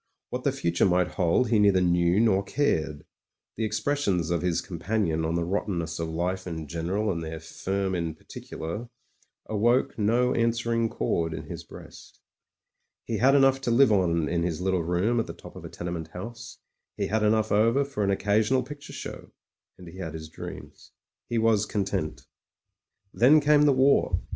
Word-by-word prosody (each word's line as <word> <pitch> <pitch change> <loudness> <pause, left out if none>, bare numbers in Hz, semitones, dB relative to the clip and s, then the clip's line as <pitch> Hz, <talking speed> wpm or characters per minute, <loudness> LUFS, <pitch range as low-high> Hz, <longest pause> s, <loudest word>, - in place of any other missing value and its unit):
What - - -4
the - - +2
future 85 +3 +1
might 90 -1 +2
hold 95 +6 +1
he 110 - +4
neither 100 -2 +5
knew 90 +1 +2
nor 105 -4 +3
cared; 80 - -1 0.5
the 115 - -3
expressions 110 - 0
of 85 - 0
his 90 -2 0
companion 90 -3 -1
on 80 +1 -1
the 85 - 0
rottenness 85 -3 -2
of 80 -1 -2
life 90 +3 -2
in 80 -3 -5
general 90 +7 -1
and 85 -2 -3
their 80 0 -6
firm 95 +4 -3
in 85 -3 -2
particular 85 +8 -7 0.6
awoke 115 +4 +1
no 120 +4 +2
an 115 0 +2
swering 115 -1 0
chord 80 -5 -1
in - - -6
his - - -8
breast - - -13 0.9
He 115 - -2
had 135 +5 +4
enough 135 -1 +4
to 130 - -2
live 120 0 +5
on 85 -5 +2
in 85 +2 0
his 85 -2 -2
little 95 -1 0
room 90 +8 +1
at 115 - -1
the - - -6
top - - -13
of - - -10
a - - -7
tenement 85 -2 -5
house 115 +8 -9 0.2
— - - -59
he - - 0
had 110 +1 0
enough 110 0 +2
over 115 +7 +3
for 120 -7 -3
an 100 - +1
occasional 105 +6 +2
picture 145 -1 -10
show - - -8 0.3
— - - -41
^and 90 - -11
he 90 +3 -11
had 80 -4 -5
his 80 0 -8
dreams. - - -10 0.4
He 120 - -1
was 110 -2 +2
content. 95 -7 -3 0.9
Then 140 +7 +6
came 150 0 +4
the 145 - +5
war. 130 -8 +3
100 Hz, 185 wpm, -26 LUFS, 85-115 Hz, 0.9 s, Then